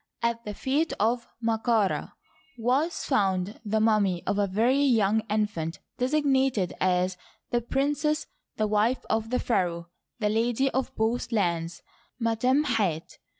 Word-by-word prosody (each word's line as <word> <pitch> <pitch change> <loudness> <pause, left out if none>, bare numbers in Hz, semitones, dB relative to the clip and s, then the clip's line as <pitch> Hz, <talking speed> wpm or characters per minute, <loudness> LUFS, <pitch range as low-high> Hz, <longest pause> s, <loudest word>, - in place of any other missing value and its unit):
At 235 0 0
the 210 -1 -5
feet 290 +8 0
of 235 +2 +1 0.2
Md 225 -1 0
ka 225 -4 +3
Rd 190 - -3 0.5
was 260 +9 0
found 195 -5 0
the 220 0 0
mummy 210 -5 +2
of 205 - 0
a 200 - +2
veiy 255 +8 +2
young 220 -2 +3
infant 205 -6 -1 0.2
designated 265 - +1
as 180 0 +1 0.2
" - - -40
the 240 - +1
princess, 295 +5 0 0.3
the 215 - +1
wife 215 +4 +1
of 220 0 0
the 250 - +1
pharaoh, 175 -8 -1 0.3
the 210 -3 0
lady 240 +5 +1
of 265 0 -1
Both 230 +2 -1
Lands, 175 -5 -1 0.4
Mui 230 -1 -1
em 265 +4 +4
hat. 205 - -1
225 Hz, 150 wpm, -27 LUFS, 200-255 Hz, 0.5 s, em